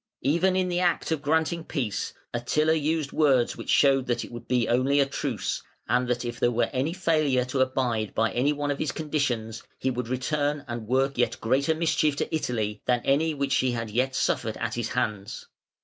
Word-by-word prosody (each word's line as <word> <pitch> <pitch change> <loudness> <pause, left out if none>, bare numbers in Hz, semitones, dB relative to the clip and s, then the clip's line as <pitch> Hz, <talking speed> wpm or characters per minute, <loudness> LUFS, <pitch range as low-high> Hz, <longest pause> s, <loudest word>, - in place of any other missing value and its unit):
Even 170 +6 +2
in 185 -1 +1
the 175 -1 0
act 175 -2 +1
of 160 -3 0
granting 160 +2 +1
peace 120 -11 -3 0.2
Attila 150 +6 +1
used 155 -1 0
words 135 -6 +3
which - - -8
showed 135 -2 +4
that 120 -1 -1
it - - -13
would 120 -1 -9
be 125 -2 +1
only 130 +4 +2
a 140 - +5
truce, 135 -3 -3 0.3
and 125 0 +2
that 125 0 -1
(452) - - -3
if 120 -1 -5
there 120 - +3
were 120 0 +1
any 135 +5 0
failure 155 -8 +1
to 130 +1 -3
abide 125 -5 0
by 115 0 +2
any 130 +4 +2
one 145 -1 -1
of 140 - -3
his 155 -3 -1
conditions, 125 -8 -2 0.2
he 130 - -1
would 125 -1 -3
return 145 +3 -1
and 120 -2 -5
work 135 +1 +1
yet 120 - +1
greater 140 +7 +1
mischief 155 -2 +1
to 150 - -2
Italy 110 -8 -2
than 125 -1 +2
any 155 +3 +2
which 140 -1 -1
she 130 -1 +2
had 115 -2 -4
yet 130 +4 0
suffered 110 -3 0
at 115 -1 -3
his 120 -1 -2
hands. 105 -5 -3
130 Hz, 210 wpm, -26 LUFS, 120-150 Hz, 0.3 s, a